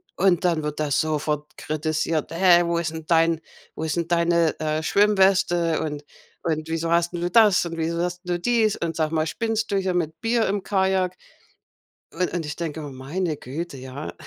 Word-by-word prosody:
Und 185 -1 +2
dann 165 -3 +1
wird 150 0 -4
das 145 -3 +1
sofort 150 -1 -2
kritisiert: 155 +1 -2
„Hä, 175 0 +5
wo 170 0 0
ist 170 -2 -1
'n 160 -1 -7
dein 165 -1 +3 0.4
wo - - -5
ist 160 0 -2
deine, 170 -1 +2
äh, 155 0 -1
Schwimmweste 190 -3 +3
und 150 -2 -4 0.4
und 155 -1 -2
wieso 165 0 -1
hast 170 0 +2
'n 175 - -4
du 175 - 0
das 210 -6 +5
und 165 -1 -5
wieso 165 +1 -1
hast 180 0 -3
'n - - -16
du 175 - -1
dies? 225 +1 +2
Und 165 -1 -3
sag 155 -1 0
mal, 160 -1 0
spinnst 225 +5 -2
du 200 - +2
hier 190 -1 0
mit 160 -3 -2
Bier 230 0 +2
im 200 0 -1
Kajak?” 190 -2 +1 1.0
Un 180 - 0
und 170 -3 -3
ich 150 - -5
denke 160 -2 -4
immer: 145 - -7
„Meine 150 +5 -3
Güte, 145 +3 -6
ja. 130 +3 -7
170 Hz, 200 wpm, -24 LUFS, 155-180 Hz, 1.0 s, Hä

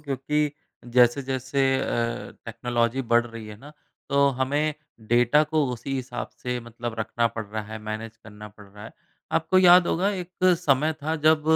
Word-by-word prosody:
क्योंकि 150 +1 -1 0.4
जैसे-जैसे 130 +2 +2 0.2
अ, 115 0 -2
टेक्नोलॉज़ी 120 +2 -1
बढ़ 120 -1 +3
रही 115 -2 -9
है 105 -1 -9
ना 145 +5 -13 0.4
तो 140 0 +4
हमें 145 +3 0 0.3
डेटा 120 +5 +4
को 155 0 +1
उसी 135 +3 -5
हिसाब 125 -2 -4
से 125 0 -2
मतलब 120 0 -7
रखना 115 +1 0
पड़ 115 -1 -5
रहा 110 +1 -5
है 110 - -5
मैनेज 110 +1 -6
करना 105 -1 -12
पड़ 105 0 -16
रहा 105 +2 -13
है। - - -10 0.4
आपको 165 +3 +2
याद 180 -1 +7
होगा 185 +4 +1
एक 180 -3 -5 0.3
समय 150 +2 +2
था 155 +2 -1
जब 155 0 +3
125 Hz, 165 wpm, -25 LUFS, 115-150 Hz, 0.4 s, याद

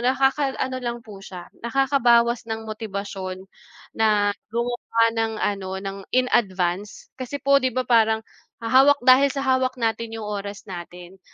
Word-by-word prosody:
nakaka-ano 265 0 0
lang 235 -1 -4
po 205 -3 -11
siya, 180 -3 -10
nakakabawas 235 -2 +2
ng 220 0 -4
motibasyon 200 -4 -6 0.5
na 210 -2 +2 0.2
gumawa 235 0 0
ng 225 -1 -1
ano 200 -3 -2
ng 195 0 -5 0.2
in 255 0 +3
advance. 190 -1 -1
Kasi 255 +3 -4
po 275 0 +3
'di 260 - +1
ba 255 0 0
parang 220 -2 +3 0.4
hahawak 265 +3 +5
dahil 260 +2 +7
sa 275 0 -3
hawak 260 -1 +1
natin 225 -1 -2
'yong 220 - -6
oras 205 -1 -5
natin, 180 0 -10
225 Hz, 145 wpm, -23 LUFS, 205-255 Hz, 0.5 s, dahil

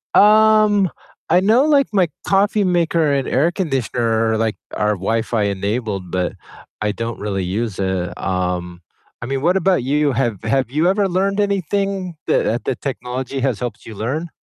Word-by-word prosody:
Um, 215 -2 +5 0.4
I 180 - +5
know, 225 +8 +4
like, 285 -3 +4
my 190 -4 +3 0.2
coffee 205 +2 +2
maker 170 -4 +2
and 135 -2 0
air 150 +7 +2
conditioner 120 - 0
are, - - 0
like 110 -1 0 0.2
are 105 0 +1
Wi-Fi 110 +3 -1
enabled, 100 -1 -2
but 90 -1 -1 0.5
I 105 - +1
don't 115 +2 -5
really 100 -2 -2
use 100 +3 -3
it, 95 -2 -2
um, 90 -2 -2 0.4
I - - -4
mean, 135 +2 -2
what 175 +5 +3
about 190 -5 +2
you? 145 +3 +1
Have 120 -6 -1
have 125 +3 0
you 155 +5 +1
ever 195 +1 +2
learned 195 +3 0
anything 195 -2 -1
that, - - +2
uh 115 - 0
that 125 - -3
technology 130 0 -4
has 130 -5 0
helped 120 -4 -5
you 110 - -9
learn? 140 +11 -3
130 Hz, 170 wpm, -19 LUFS, -, 0.5 s, Um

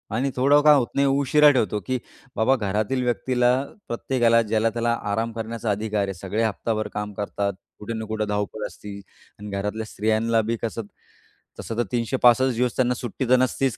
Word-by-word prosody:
आणि 135 +4 0
थोडं 140 +3 +4
काम 150 -1 +7
होत 120 - -1
नाही, 140 0 +3
उशिरा 140 +2 +5
ठेवतो, 110 -6 0
की 130 - 0 0.4
बाबा 120 +4 +3
घरातील 110 +3 -1
व्यक्तीला, 125 0 +1 0.4
प्रत्येकाला 120 -1 +2
ज्याला-त्याला 115 +2 0 0.2
आराम 115 +2 -1
करण्याचा 115 0 -3
अधिकार 105 0 -1
आहे. 95 - -4
सगळे 95 +5 -2
हप्ताभर 110 0 -1
काम 105 0 -4
करतात. 100 0 -2 0.3
कुठे 105 +2 -5
ना 110 - -4
कुठे 110 0 -2
धावपळ 105 +1 -3
असती 100 -1 -10 0.4
आणि 105 0 -8
घरातल्या 105 +3 -3
स्त्रियांला 110 +2 +1
बी 115 +2 -2
कसं, 115 0 -3 0.8
तसं 115 - -5
तर 120 - +2
365 125 +1 +3
दिवस 125 0 0
त्यांना 125 -1 +2
सुट्टी 125 +1 -4
तर 130 - +7
नसतीच. 130 0 0
115 Hz, 170 wpm, -24 LUFS, 105-125 Hz, 0.8 s, काम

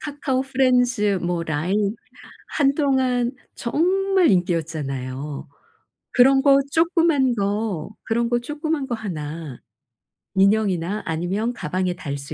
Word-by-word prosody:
카카오프렌즈 255 -7 +1
뭐 175 -1 -1
라인 185 +7 -1 0.6
한동안 265 -4 +2 0.2
정말 370 +7 +2
인기였잖아요. 150 -6 -2 0.7
그런 270 +1 +5
거 275 -1 +6
쪼끄만 325 -6 +2
거 200 -4 -2
그런 235 +1 0
거 240 - +1
쪼끄만 295 +2 -3
거 240 - -2
하나 160 - -6 0.8
인형이나 195 -1 +2
아니면 185 +8 -2
가방에 185 -2 -2
달 145 -6 -5
수 140 0 -8
220 Hz, 235 characters per minute, -22 LUFS, 175-270 Hz, 0.8 s, 거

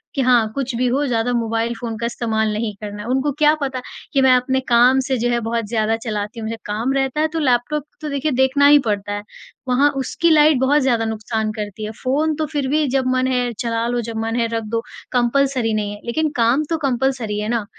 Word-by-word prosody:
कि 275 - +1
हाँ, 245 -3 +4
कुछ 265 -2 -2
भी 250 +1 +1
वो 280 +3 +1
ज़्यादा 235 0 0
मोबाइल 230 0 -1
फ़ोन 230 -2 -4
का 235 - -3
इस्तेमाल 220 -2 -1
नहीं 215 0 -2
करना 205 0 -6
है। 235 - -7
उनको 265 +3 +1
क्या 300 0 +5
पता 265 -2 -2 0.3
कि 270 - +3
मैं 265 - +5
अपने 260 +1 +1
काम 245 +2 +5
से 265 - 0
जो 240 +1 0
है 240 0 +1
बहुत 230 0 -2
ज़्यादा 225 -1 +1
चलाती 215 +1 -4
हूँ। 220 - -5
मुझे 225 0 -4
काम 220 +6 -1
रहता 270 +2 0
है 315 - +3
तो 325 - -1
लैपटॉप 270 +1 +1 0.2
तो 305 - -4
देखिए 280 +2 -1
देखना 265 +2 +3
ही 290 0 +7
पड़ता 205 -1 -1
है। 205 0 -4 0.4
वहाँ 260 +3 +4
उसकी 335 +5 0
लाइट 300 -2 +5
बहुत 285 +3 +3
ज़्यादा 235 -4 +1
नुकसान 220 0 -2
करती 210 +1 -5
है। 215 - -5
फ़ोन 300 +4 +1
तो 310 0 -1
फ़िर 285 -3 -1
भी 300 +1 +2
जब 260 0 0
मन 255 0 +1
है 245 -1 0
चला 230 0 -1
लो 240 0 -1
जब 225 -1 -6
मन 225 +1 -2
है 230 - +1
रख 225 0 -1
दो 230 - +1 0.3
कंपल्सरी 250 -1 +1
नहीं 210 -1 -1
है - - -14
लेकिन 310 +7 0
काम 235 +6 +3
तो 330 - 0
कंपल्सरी 245 -4 -1
है 210 +1 -3
ना। 235 -3 -1
245 Hz, 235 wpm, -20 LUFS, 225-270 Hz, 0.4 s, ही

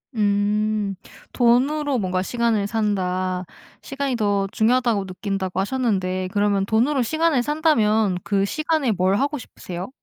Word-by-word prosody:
음. 210 0 0 0.4
'돈으로 265 +3 +2
뭔가 185 -1 -1
시간을 230 -3 0
산다. 185 -4 -1 0.4
시간이 275 -1 -3
더 205 -3 0
중요하다고 230 -3 +2
느낀다.'고 190 0 -3
하셨는데 190 -5 -1
그러면 205 -1 +1
돈으로 245 +6 +2
시간을 315 0 +1
산다면 225 - +2
그 195 -1 +1
시간에 310 +1 0
뭘 190 -1 +1
하고 285 +6 0
싶으세요? 180 -5 -8
210 Hz, 305 characters per minute, -22 LUFS, 195-250 Hz, 0.4 s, 돈으로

